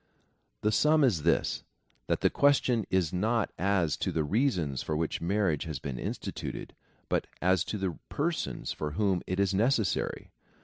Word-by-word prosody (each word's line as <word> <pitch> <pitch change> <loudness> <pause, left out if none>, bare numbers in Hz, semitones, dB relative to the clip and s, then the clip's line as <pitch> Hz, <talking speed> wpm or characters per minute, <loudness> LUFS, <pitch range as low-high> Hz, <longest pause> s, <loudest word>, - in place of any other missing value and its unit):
The 105 - +2
sum 150 +7 +4
is 105 - +3
this 85 +3 +1 0.2
— - - -40
that - - 0
the - - +3
question 130 -6 +3
is 95 -4 +1
not 110 +4 +1
as 90 -5 +2
to - - -1
the 80 - 0
reasons 90 - 0
for 75 - -2
which 80 0 -2
marriage 90 -3 +1
has 80 -4 -4
been 65 -1 -5
instituted, - - -5 0.3
but - - 0
as 90 -1 +3
to 105 - -3
the 95 -4 -3
persons 165 +3 -2
for 75 -1 -4
whom 95 -1 +1
it 95 +1 -1
is 100 -1 +2
necessary. 110 -2 0
95 Hz, 170 wpm, -29 LUFS, 80-110 Hz, 0.3 s, sum